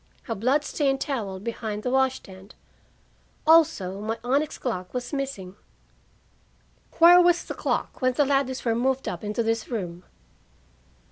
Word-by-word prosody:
"A 230 - -1
blood 255 +8 +1
stained 275 -3 0
towel 210 -11 -3
behind 215 0 -5
the 250 - -1
wash 265 0 +2
stand. 190 -1 -13 0.9
Also, 220 - +3
my 220 +2 -3
onyx 280 +5 0
clock 185 -5 -4
was 250 +3 -4
missing." 265 -10 -4 1.4
"Where 350 +2 +8
was 350 0 +3
the - - -6
clock - - -3
when 255 0 +2
the 290 +3 +2
Ladleys 270 -2 0
were 230 - +2
moved 260 +3 0
up 175 - -5
into 210 +3 -2
this 225 0 -1
room?" 180 -7 -5
245 Hz, 145 wpm, -25 LUFS, 210-275 Hz, 1.4 s, Where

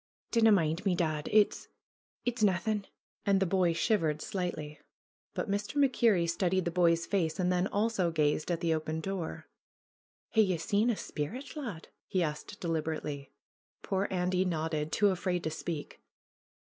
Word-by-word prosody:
'^Dinna 225 -1 +5
mind 165 -2 +2
me, 190 -3 +2
dad. 155 -4 -1
It's 210 -1 +3 0.3
— - - -52
it's 245 -1 -1
naethin'." 205 +1 +2 0.4
And 195 -1 +3
the 195 - +2
boy 180 -1 +2
shivered 165 -4 +1
slightly. 155 -5 -4 0.6
But - - -2
Mr. 205 +5 -2
MacKerrie 235 -10 +3
studied 180 +2 +1
the 170 - 0
boy's 170 -1 +3
face 165 -5 0
and 180 0 +2
then 180 +1 +2
also 205 -4 +1
gazed 155 -1 +1
at 170 -1 -1
the 165 -2 +2
open 155 0 -2
door. 185 -1 -4 0.8
"Hae 220 - +4
ye 190 -4 +2
seen 205 +7 +1
a 235 - +2
sperrit, 225 - -5
lad 230 - -6
?" - - -62
he 185 -2 +1
asked 150 +6 -5
deliberately. 155 -4 -3 0.5
Poor 195 +1 0
Andy 180 0 +1
nodded, 160 -3 -1
too 205 -1 +4
afraid 180 -1 -1
to 160 - -2
speak. 160 -1 -5
180 Hz, 160 wpm, -31 LUFS, 160-200 Hz, 0.8 s, ^Dinna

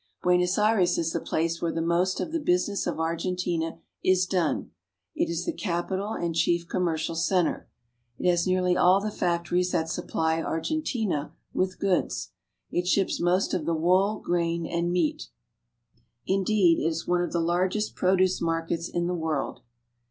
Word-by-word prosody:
Buenos 180 +1 +3
Aires 210 -4 +3
is 165 -1 0
the - - 0
place 165 +1 -1
where 170 - 0
the 165 - -3
most 170 +3 +1
of - - -3
the 330 - 0
busi 180 - +1
ness 200 -2 -2
of 175 - -2
Argentina 170 0 -1 0.3
is 185 0 +3
done. 180 -4 -1 0.4
It - - 0
is 170 +1 -2
the - - -1
capital 190 +3 -2
and 170 -4 -2
chief 170 +1 +1
commqrcial 165 -2 -1
center. 180 +1 0 0.5
It - - -1
has 175 0 +2
nearly 185 -1 +2
all 180 +2 +5
the 210 +1 -3
factories 175 0 0
that - - +3
Buenos 160 - -6
Aires. - - -7
supply 160 0 0
Argentina 200 - -2 0.2
with 185 0 -1
goods. 195 -3 -1 0.4
It 180 0 -1
ships 195 +1 +1
most 180 +3 +1
of 170 -4 -1
the 165 - +1
wool, 185 +6 +2
grain, 170 -1 0
and 170 +1 -1
meat. 160 - 0 1.0
Indeed, 190 -2 +3
it 155 - 0
is 165 0 -3
one 175 0 +2
of 175 - -2
the 170 - 0
largest 180 +5 0
produce 185 0 +2
markets 165 0 -1
in 175 0 -1
the 180 - -1
world. 160 -6 -2
175 Hz, 175 wpm, -27 LUFS, 165-185 Hz, 1.0 s, all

